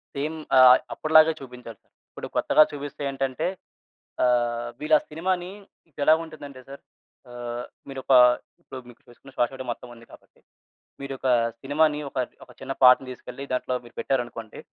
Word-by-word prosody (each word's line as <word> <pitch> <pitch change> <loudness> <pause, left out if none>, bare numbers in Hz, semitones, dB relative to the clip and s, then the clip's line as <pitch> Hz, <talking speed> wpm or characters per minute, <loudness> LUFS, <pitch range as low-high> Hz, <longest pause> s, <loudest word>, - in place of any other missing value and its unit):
Same. 150 +3 -3 0.2
ఆహ్, 130 0 +9 0.2
అప్పటిలాగే 155 +1 +5
చూపించాలి. 125 -4 -11 0.3
ఇప్పుడు - - -8
కొత్తగా 155 - +5
చూపిస్తే 145 0 -7
ఏంటంటే 135 +4 -2 0.8
ఆహ్, 120 -1 +1
వీళ్ళా 155 +1 +4
సినిమా‌ని 180 +3 -2 0.4
ఇదేలా 145 +2 +3
ఉంటుందంటే 145 -4 -11
సార్ 140 - -10 0.5
ఆహ్, 120 0 -6 0.2
మీరొక 135 -1 -3 0.5
ఇప్పుడు 130 - -9
మీకు 120 - -16
చూసుకున్న 130 +3 -17
శ్వాసడ 130 +2 -1
మొత్తం 120 - -7
ఉంది 115 0 -17
కాబట్టి - - -19 0.6
మీరొక 135 -1 -6 0.3
సినిమా‌ని 150 +2 +1
ఒక 135 - -6 0.3
ఒక 125 - -17
చిన్న - - -4
పాటని 130 +1 +6
తీసుకెళ్ళి 125 +2 -9
దాంట్లో 125 0 -2
మీరు 120 - -17
పెట్టారనుకోండి 120 -4 -3
135 Hz, 135 wpm, -25 LUFS, 125-150 Hz, 0.8 s, ఆహ్